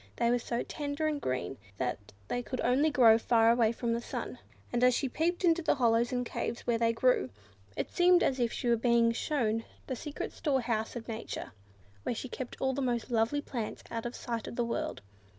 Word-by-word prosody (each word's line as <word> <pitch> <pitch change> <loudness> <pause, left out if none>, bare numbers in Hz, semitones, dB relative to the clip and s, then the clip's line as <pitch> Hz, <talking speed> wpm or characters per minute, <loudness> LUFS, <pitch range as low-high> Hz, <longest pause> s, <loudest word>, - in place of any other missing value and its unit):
They 235 0 +2
were 245 - +2
so 235 0 -2
tender 290 +1 -3
and 300 -2 0
green 130 +1 -3 0.2
that 100 +1 -3 0.2
they 245 - -1
could 255 +1 -5
only 265 +6 +3
grow 230 -6 +6
far 230 0 +4
away 230 -2 +3
from 235 0 -1
the 235 - -1
sun, - - -5 0.3
and 240 +1 +1
as 250 -1 +6
she 270 - 0
peeped 340 +7 0
into 340 0 +4
the 315 - +2
hollows 235 -2 +3
and 245 -1 -1
caves 240 - -3
where 235 -1 0
they 230 0 +3
grew, 230 - +2 0.5
it - - -2
seemed 355 0 +5
as 265 - +1
if 235 -2 +1
she - - -3
was 235 -1 +3
being 235 -1 +4
shown 230 -3 0 0.2
the 260 - -3
secret 290 +4 -5
store 275 -4 0
house 225 -1 -2
of 235 -2 -6
Nature, 225 0 -5 0.5
where 235 - -2
she 260 - -5
kept 255 0 -6
all 265 0 +1
the 280 - -2
most 245 -1 -1
lovely 230 +5 +2
plants, 235 -6 -5
out 230 0 -3
of 240 - -7
sight 235 -3 -4
of - - -6
the 240 - 0
world. 230 - -3
240 Hz, 220 wpm, -31 LUFS, 230-265 Hz, 0.5 s, grow